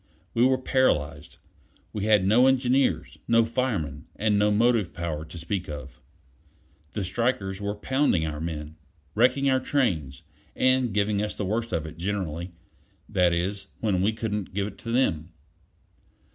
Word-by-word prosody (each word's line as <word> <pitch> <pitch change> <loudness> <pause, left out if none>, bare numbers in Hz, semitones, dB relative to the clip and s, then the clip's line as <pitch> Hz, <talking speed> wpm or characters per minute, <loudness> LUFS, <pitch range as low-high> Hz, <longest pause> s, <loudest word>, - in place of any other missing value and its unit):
We 115 - +3
were 130 0 +3
paralyzed. 80 - 0 0.6
We 105 -1 -2
had 105 -3 +4
no 120 +6 +5
engineers, 130 0 +1
no 115 -1 +4
firemen, 100 - -2
and 105 0 +1
no 105 0 +4
motive 110 -3 +2
power 80 -3 -3
to 85 - -10
speak 90 +2 -3
of. 75 -3 -8 0.9
The 105 - -2
strikers 95 -1 -1
were 100 +1 -2
pounding 120 - +1
our 75 -1 -4
men, 80 -1 -5 0.4
wrecking 130 +5 +3
our 130 -1 +3
trains, 80 - -1 0.3
and 130 -2 +3
giving 105 0 +1
us 105 0 -2
the 105 - -3
worst 115 +4 -2
of 80 - -1
it 80 +1 -9
generally; 90 -3 -3 0.6
that 90 -1 +3
is, 95 +3 -2
when 100 -5 +1
we 100 +3 +3
couldn't 105 -4 -4
give 100 -1 0
it 100 -1 -8
to 115 - -6
them. 90 -10 0
105 Hz, 155 wpm, -26 LUFS, 85-115 Hz, 0.9 s, no